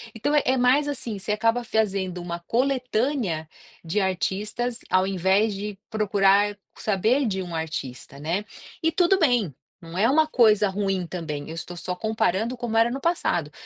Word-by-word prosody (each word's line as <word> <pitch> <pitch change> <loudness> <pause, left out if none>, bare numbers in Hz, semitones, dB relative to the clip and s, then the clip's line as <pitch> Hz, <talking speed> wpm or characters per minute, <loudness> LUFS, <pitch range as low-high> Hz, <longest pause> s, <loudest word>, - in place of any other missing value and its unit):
Então 240 +7 -1
é 265 -3 +3
mais 260 +4 +3
assim, 245 -7 -3
você 195 +2 -3
acaba 230 +3 +1
fazendo 195 -5 -1
uma 170 0 -5
coletânea 245 - 0 0.4
de 170 +5 -1
artistas 210 +6 -1
ao 185 0 +3
invés 195 +3 +2
de 200 0 -5
procurar 205 -1 +3 0.2
saber 220 +7 +1
de 190 -2 -1
um 175 -2 -6
artista, 140 -4 -5
né. 170 +7 -1 0.4
E 325 - +3
tudo 355 +3 +3
bem, 245 - +2 0.3
não 165 +1 -9
é 210 +4 +4
uma 310 +2 +4
coisa 215 -7 +4
ruim 195 -2 -1
também, 155 -4 -5
eu 160 - -6
estou 175 +1 -7
só 180 +1 -4
comparando 220 +2 0
como 235 -2 -2
era 230 +1 +4
no 270 +2 -4
passado. 175 - 0
210 Hz, 165 wpm, -25 LUFS, 180-240 Hz, 0.4 s, é